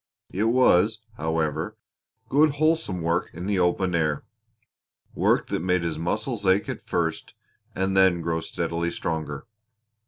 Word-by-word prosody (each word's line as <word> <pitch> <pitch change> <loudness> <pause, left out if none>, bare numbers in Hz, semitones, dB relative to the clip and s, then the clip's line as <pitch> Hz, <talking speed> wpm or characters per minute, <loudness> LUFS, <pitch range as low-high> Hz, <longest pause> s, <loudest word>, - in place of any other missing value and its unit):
It 100 +4 0
was, 110 -3 +3
however, 80 -1 -1 0.5
good 145 +1 +3
wholesome 155 - +1
work 85 +2 0
in 90 +2 -6
the 100 -1 0
open 90 +1 +1
air 75 -3 0 0.9
work - - +2
that - - -1
made 90 0 +1
his 80 -2 -2
muscles 105 +6 -2
ache 95 +1 +3
at - - -4
first 80 -2 -2 0.4
and 95 +1 0
then 95 -2 +4
grow 80 0 -1
steadily 85 +1 -2
stronger. 80 0 -4
90 Hz, 135 wpm, -25 LUFS, 80-105 Hz, 0.9 s, then